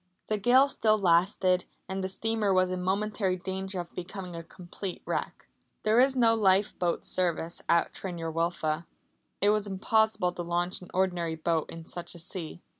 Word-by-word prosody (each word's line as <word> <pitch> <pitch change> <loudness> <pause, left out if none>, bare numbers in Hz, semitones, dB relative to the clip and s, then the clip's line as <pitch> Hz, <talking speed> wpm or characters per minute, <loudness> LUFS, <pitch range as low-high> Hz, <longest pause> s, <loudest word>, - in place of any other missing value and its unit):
The 215 -1 0
gale 255 +6 +5
still 215 -5 +2
lasted, 185 0 +3 0.2
and 190 0 -3
the - - 0
steamer 220 +1 0
was 185 -1 +3
in 185 0 -2
momentary 195 0 0
danger 190 +1 -4
of 175 -1 -7
becoming 180 0 -7
a 165 - -5
complete 180 +2 -8
wreck. - - -3 0.4
There 215 +2 +4
is 265 +1 +4
no 230 -3 +5
lifeboat 190 -4 +2
service 170 -2 -1
at 170 - +3
Tryn 180 -3 -6
yr 165 -1 -3
Wylfa. 165 -1 -1 0.5
It 205 +1 +5
was 210 -1 +1
impossible 210 -1 +1
to 175 - -6
launch 175 +1 -1
an 180 - -12
ordinary 175 -3 0
boat 160 0 -1
in 165 -1 -9
such 175 +1 -4
a - - -6
sea. 170 0 -3
185 Hz, 175 wpm, -29 LUFS, 175-205 Hz, 0.5 s, gale